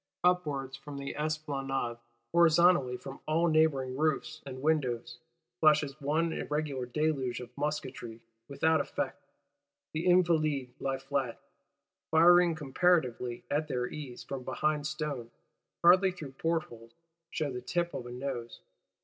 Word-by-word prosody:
—Upwards 150 -7 +1
from 140 +1 -9
the 140 0 -5
Esplanade, 140 -5 -2 0.3
horizontally 170 -6 +5
from 135 - -9
all 165 +3 +2
neighbouring 155 -5 +2
roofs 155 +1 -1
and 130 0 -7
windows, 120 -6 0 0.4
flashes 150 -2 +3
one 160 +4 +1
irregular 150 -4 -2
deluge 135 -2 -1
of 125 0 -10
musketry,—without 135 0 -2
effect. - - -4 0.7
The 160 +3 -2
Invalides 155 -7 +3
lie 135 -1 -1
flat, 135 -2 -2 0.7
firing 175 +1 +6
comparatively 135 -6 +1
at 150 +2 0
their 125 -4 -1
ease 130 -2 -7
from 135 -2 -5
behind 150 +2 -1
stone; 150 -6 -4 0.5
hardly 185 +3 +7
through 155 -7 -8
portholes, 135 -7 -3 0.4
shew 155 -5 -2
the 125 - -5
tip 175 -1 -1
of 120 - -5
a - - -8
nose. 125 -2 -5
145 Hz, 125 wpm, -31 LUFS, 130-160 Hz, 0.7 s, hardly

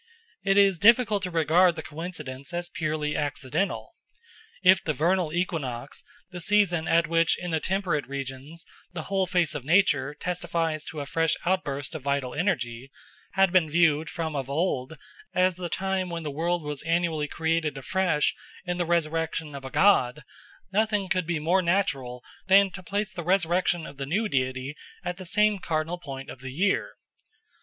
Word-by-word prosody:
It 195 +1 +2
is 195 -4 +5
difficult 220 -1 +5
to 185 - -3
regard 170 +1 +4
the 160 - -5
coincidence 150 -2 -7
as 175 0 -3
purely 155 -2 -2
accidental. 145 +5 -2 0.7
If 185 0 +6
the 155 - -1
vernal 175 0 +1
equinox, 145 -8 -3 0.3
the 180 0 -7
season 180 -4 +2
at 165 0 +4
which 165 0 +2
in 180 -1 -5
the 160 - +1
temperate 185 -5 -1
regions 140 +4 -6 0.3
the 160 -3 -4
whole 195 +1 0
face 175 -3 +1
of 150 - -5
nature 150 -4 +3
testifies 165 -3 -2
to 155 -2 -5
a - - -4
fresh 165 +2 +1
outburst 145 -6 -1
of 160 - -5
vital 140 -2 -1
energy, 130 - -1 0.4
had 195 -2 +4
been 175 -4 +4
viewed 160 -1 +3
from 160 -2 -4
of 135 -1 -3
old 150 -2 -1 0.4
as 185 0 +3
the 180 -1 -5
time 190 0 -1
when 170 -1 -4
the 150 - -3
world 170 +3 -1
was 150 -2 -4
annually 165 -2 0
created 160 -1 -1
afresh 170 +2 +1 0.3
in 175 -1 -2
the 175 - 0
resurrection 160 -2 -1
of 140 -1 -7
a 135 - -6
god, 150 -7 +3 0.5
nothing 210 -2 +1
could 185 -4 0
be 170 -2 0
more 170 +5 +2
natural 140 -10 -1 0.2
than 195 0 +6
to 190 - -7
place 205 +3 -3
the 175 - -5
resurrection 175 -1 +1
of 140 - -10
the 135 -1 -4
new 210 +9 0
deity 130 -2 -2 0.3
at 180 0 -3
the 185 -2 -7
same 210 +2 +3
cardinal 160 +1 -2
point 135 -5 -7
of - - -9
the 130 +1 -7
year. 190 +9 0
165 Hz, 170 wpm, -26 LUFS, 150-185 Hz, 0.7 s, If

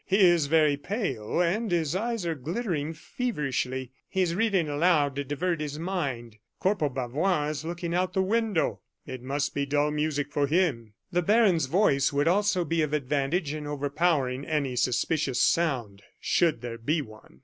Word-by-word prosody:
He 195 - +1
is 175 -5 +5
very 155 -2 +3
pale, 145 - -3
and 210 +6 0
his 170 -2 0
eyes 225 -1 -2
are 165 - 0
glittering 160 - -3
feverishly. 140 - -3 0.2
He 190 -1 +1
is 170 -2 0
reading 195 -4 +1
aloud 145 -2 +2
to 140 - -2
divert 155 +4 -2
his 150 -1 -4
mind. 140 - -3 0.2
Corporal 185 -6 +1
Bavois 145 +6 0
is 150 0 -5
looking 170 0 -4
out 180 +1 +2
of - - -30
the 190 - +3
window. 215 -3 0 0.3
It 130 -1 -7
must 140 +3 -2
be 140 0 -1
dull 145 +1 +1
music 150 -1 -1
for 145 -1 +1
him." 135 - 0 0.2
The 175 0 +2
baron's 190 - +3
voice 140 -5 +3
would 145 +2 +1
also 185 -1 +2
be 165 +1 0
of 150 -1 -1
advantage 145 +3 0
in 150 -1 -5
overpowering 145 -2 0
any 145 -4 -1
suspicious 130 +2 0
sound, 125 -12 +1 0.2
should 165 -9 +1
there 115 -1 -6
be 150 +7 0
one. 110 -2 -16
150 Hz, 170 wpm, -27 LUFS, 140-180 Hz, 0.3 s, is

